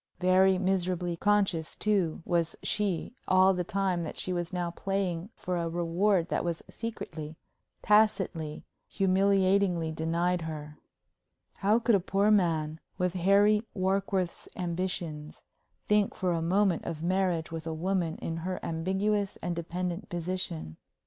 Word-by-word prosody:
Very 185 +1 +4
miserably 180 -2 0
conscious, 190 -4 +1
too, 190 -7 0
was 170 -2 0
she 205 -1 -1
all 185 +1 +5
the 180 -1 -1
time 185 -1 0
that 160 - -6
she 185 - -1
was 175 -1 -3
now 175 -2 -2
playing 190 -1 -2
for 180 -1 -3
a 170 -1 -1
reward 175 +2 +1
that - - 0
was 170 -1 -3
secretly, 160 -9 -6 0.5
tacitly, 195 -7 +2 0.3
humiliatingly 190 -3 +2
denied 170 +3 0
her. 150 -2 -7 0.7
How 205 +3 +2
could 235 0 +2
a 200 - +5
poor 195 +3 +2
man, 160 -6 +2 0.2
with 180 -1 0
Harry 200 +3 +4
Warkworth's 190 -1 -1
ambitions, 170 -4 -4 0.4
think 210 -1 +2
for 185 -1 0
a 165 - -1
moment 185 +1 +2
of 165 -1 -4
marriage 180 -3 0
with 165 0 -5
a - - -2
woman 175 -1 -1
in 165 - -4
her 185 +3 -3
ambiguous 190 +5 0
and 175 0 -1
dependent 175 +3 -4
position? 170 - -4
180 Hz, 135 wpm, -29 LUFS, 165-195 Hz, 0.7 s, all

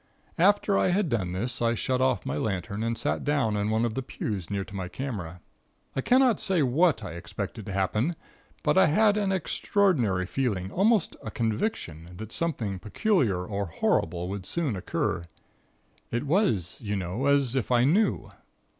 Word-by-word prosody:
"After 200 +2 +4
I - - +3
had 185 -1 +1
done 95 -7 -1
this 120 +8 -2
I 115 0 +2
shut 130 +3 0
off 130 -6 +1
my 70 - -2
lantern 100 +3 -2
and 115 0 -1
sat - - -1
down 140 -8 +1
in 105 0 0
one 110 +2 +2
of 115 - -2
the 135 - -2
pews 105 -8 -4
near 100 -1 -1
to 100 - -11
my 95 -2 -3
camera. 90 -9 -5 0.5
I 135 - 0
cannot 255 - +4
say 185 -5 +2
what 140 -1 +3
I - - -5
expected 85 0 -6
to - - -4
happen, 105 - 0 0.5
but - - +4
I - - +6
had 205 +6 +4
an 205 -2 +1
extraordinary 155 - +1
feeling, 95 -4 -2
almost 205 0 +2
a - - -6
conviction, 105 - -3
that 110 +2 -7
something 115 - -2
peculiar 110 - +1
or 100 0 -3
horrible 85 +1 0
would 100 -1 -5
soon 155 -10 -1
occur. 90 -2 -2 0.8
It 120 +3 -2
was, 135 - +1
you 105 -2 -2
know, 95 +8 -2
as 140 -3 +3
if 125 -2 -1
I 120 -1 +4
knew. 190 - +2
115 Hz, 175 wpm, -27 LUFS, 95-160 Hz, 0.8 s, I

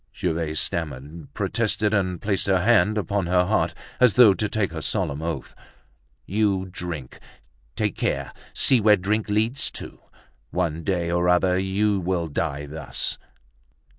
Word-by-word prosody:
Gervaise 80 -1 -1
stammered, 75 0 -3
protested, 110 -2 0
and 95 -4 0
placed 100 -2 -1
her 95 -2 +3
hand 110 -1 +4
upon 100 -1 -1
her 90 0 +3
heart, - - 0 0.2
as 125 -4 +5
though 120 -5 +8
to 105 +2 -2
take 105 -5 -1
her 80 -1 -5
solemn 80 -6 -1
oath. 80 0 -4 0.7
"You 100 -2 +1
drink! 85 -9 -6 0.6
Take - - -1
care; - - -2 0.2
see 130 -4 +3
where 105 0 +6
drink 105 +4 -1
leads 110 +7 0
to. - - -8 0.5
One 80 0 -2
day 85 -3 -1
or 85 0 +2
other 90 +1 +3
you 100 +2 +1
will 90 -1 -1
die 75 -2 -3
thus." 75 +3 -2
95 Hz, 145 wpm, -24 LUFS, 85-105 Hz, 0.7 s, though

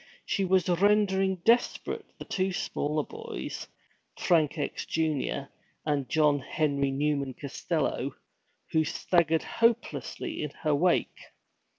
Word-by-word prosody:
She 195 - 0
was 185 -1 +3
rendering 195 +1 +3
desperate 235 +2 +2
the - - -8
two 190 0 0
smaller 150 -3 -1
boys, - - -6 0.5
Frank 160 -3 +2
X., 145 - -3
Jr., 155 -3 0 0.4
and 145 -3 0
John 150 -2 +3
Henry 140 0 0
Newman 140 -1 0
Costello, 140 -2 -2 0.6
who 160 - +3
staggered 165 0 +2
hopelessly 235 +8 0
in 150 - -2
her 155 -2 +3
wake. 170 +5 +1
160 Hz, 110 wpm, -29 LUFS, 145-190 Hz, 0.6 s, was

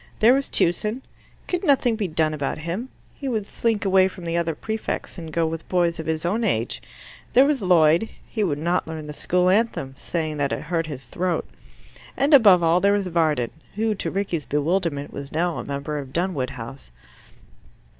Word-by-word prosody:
There 230 +3 +6
was 275 +1 0
Tewson; 210 +9 0 0.4
could 360 +1 -2
nothing 270 -7 +3
be 215 -3 -1
done 155 -1 +1
about 145 -2 -2
him? 170 +11 -4 0.2
He 275 - -6
would 220 -5 -1
slink 225 0 -1
away 190 -1 +5
from 185 -2 -9
the 165 0 -2
other 170 -2 0
prefects 220 -1 -4
and 165 -2 -7
go 165 +1 +1
with 160 0 -5
boys 175 -2 +1
of 160 - -5
his 160 +1 -1
own 215 +7 0
age. 120 - 0 0.5
There 260 +2 +7
was 285 -4 +1
Lloyd: 170 +1 +4 0.2
he 215 - -2
would 155 -7 0
not 170 +4 0
learn 160 -1 -6
the 150 - -7
school 180 +4 +1
anthem, 190 - +1
saying 155 -3 -3
that 140 -1 0
it - - -2
hurt 165 0 -1
his 135 -4 -7
throat. 175 +8 -2 0.7
And 285 +3 +2
above 200 -10 +7
all 165 +2 +4
there 200 +2 +3
was 205 -1 +1
Varden, 155 -9 +1 0.2
who, 220 +1 +1
to 200 - -3
Rickie's 185 -6 -2
bewilderment, 150 -1 -1
was 140 0 -7
now 170 +1 0
a - - -4
member 140 +2 -4
of 135 -2 -8
Dunwood 170 -7 -1
House. 125 - -9
170 Hz, 195 wpm, -23 LUFS, 155-205 Hz, 0.7 s, There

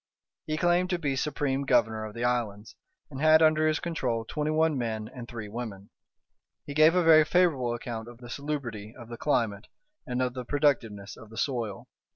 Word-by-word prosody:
He 155 0 -1
claimed 175 +2 +2
to 180 - +1
be 145 -5 -1
supreme 140 -1 -1
governor 110 -4 +2
of 105 - -9
the 115 - -3
islands, 115 -4 -2 0.4
and 135 0 -6
had 155 +1 +6
under 155 0 +4
his 155 -1 +1
control 125 -10 -2
twenty 150 +5 -2
one 160 0 +2
men 110 -4 -3
and 120 -1 -9
three 115 -3 -7
women. 105 -3 -7 0.7
He 145 - -6
gave 155 +3 +5
a 180 - +3
very 160 -1 +7
favourable 150 -8 +2
account 115 -1 -6
of 120 -1 -11
the 120 0 -12
salubrity 120 -6 -5
of 120 -2 -11
the 120 - -7
climate 115 -7 0 0.4
and 125 -1 -2
of 125 -1 0
the 125 -1 -5
productiveness 120 -8 0
of 115 - -13
the 110 - -12
soil. 115 -8 -2
125 Hz, 190 wpm, -28 LUFS, 115-155 Hz, 0.7 s, very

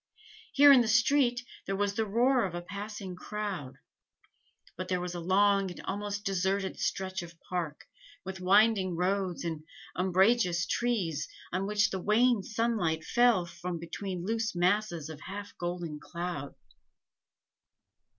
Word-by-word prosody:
Here 285 0 +8
in 265 -3 +8
the 235 - 0
street 245 +2 +3 0.2
there 195 - -1
was 200 0 0
the 220 +1 -1
roar 245 +4 +3
of 180 -3 -3
a 175 - -3
passing 200 0 -6
crowd; 190 -8 -5 1.0
but 185 +1 -5
there 180 -1 0
was 180 0 -4
a 175 - -4
long 195 +2 +3
and 175 - -9
almost 205 +1 -3
deserted 195 0 -1
stretch 190 -1 -2
of 170 -1 -11
park, 170 -6 -4 0.4
with 190 0 -6
winding 195 -1 +4
roads 185 0 -1
and 160 -2 -3 0.3
umbrageous 185 0 +3
trees, 185 -10 -1 0.2
on 190 +2 -1
which 205 -1 +2
the 190 - -2
wan 225 +3 +3
sunlight 210 -7 -1
fell 240 -5 +3
from 175 0 -5
between 175 +2 -5
loose 225 -1 -1
masses 175 -3 +1
of 155 -2 -9
half 200 +2 -7
golden 175 -3 -4
cloud. 170 -5 -5
190 Hz, 140 wpm, -30 LUFS, 175-210 Hz, 1.0 s, Here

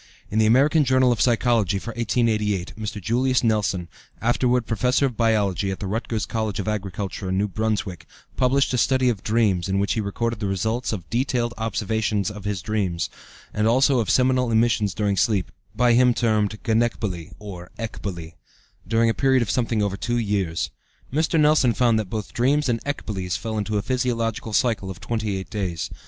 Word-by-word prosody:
In 110 - +1
the 110 - +4
American 145 +7 +4
Journal 130 -1 +3
of 115 -3 0
Psychology 115 -4 +2
for 115 +4 -5
1888, 110 -4 0
Mr. 110 -1 -5
Julius 125 +6 +1
Nelson, 100 -6 0 0.3
afterward 120 +1 +1
Professor 125 +5 +1
of 125 -4 -2
Biology 105 -4 +1
at 95 - -4
the - - -4
Rutgers 110 +2 -2
College 110 -3 -2
of 100 - -3
Agriculture, 100 -2 -3
New 100 +3 +1
Brunswick, 105 -2 -2 0.3
published 130 +1 +2
a 125 - +1
study 130 0 +3
of 105 -5 -2
dreams 105 -5 +1
in 95 - +1
which 100 +1 +1
he 110 - -1
recorded 115 +3 -2
the 105 - -2
results 110 +6 -1
of 95 -6 -5
detailed 120 -1 0
observations 110 -1 -1
of 105 -1 -10
his 100 -4 -2
dreams, 95 -6 -1 0.4
and 105 +1 +1
also 130 +3 +4
of 110 - -1
seminal 130 -1 +3
emissions 110 -4 +2
during 100 -2 0
sleep 100 -5 +1 0.2
(by 120 -1 +4
him 125 0 +4
termed 110 -2 +1
"gonekbole" 110 -7 -1
or 95 -4 -9
"ecbole"), 90 -7 -6 0.5
during 115 +2 +3
a 115 - +2
period 130 +3 +3
of 105 - -2
something 115 -3 0
over 100 -1 -1
two 120 +3 -1
years. 100 -7 -1 0.4
Mr. 160 +2 +1
Nelson 150 -5 +4
found 120 -3 +3
that 105 -4 -4
both 105 -1 -5
dreams 140 +5 +2
and 115 -2 +1
ecboles 95 -10 -3
fell 110 -1 -4
into 105 0 -1
a 100 - -1
physiological 115 -3 -1
cycle 105 -3 +1
of 95 -1 -7
28 100 -1 -3
days. 95 -6 -3
110 Hz, 175 wpm, -23 LUFS, 100-120 Hz, 0.5 s, the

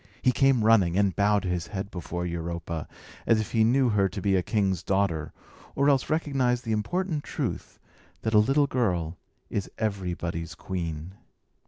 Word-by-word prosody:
He 130 - +5
came 130 -3 +3
running, 95 -6 +4
and 100 -2 +2
bowed 105 0 +3
his 90 -2 -2
head 100 -1 -5
before 90 0 -4
Europa, 85 -1 -4 0.4
as 115 - +4
if 110 - -3
he 110 -1 +3
knew 125 +3 +3
her 100 -3 +2
to 95 - -6
be 95 +1 +2
a 95 - +3
king's 95 -3 0
daughter, 95 -6 0 0.4
or 140 +1 +3
else 135 -3 +2
recognised 135 -6 +1
the 115 - -2
important 150 - -1
truth - - -4 0.5
that 110 - -1
a 105 - +7
little 135 +7 +4
girl 90 - -1 0.3
is 100 - -2
everybody's 90 -6 -3
queen. 85 -2 -5
100 Hz, 165 wpm, -27 LUFS, 90-120 Hz, 0.5 s, a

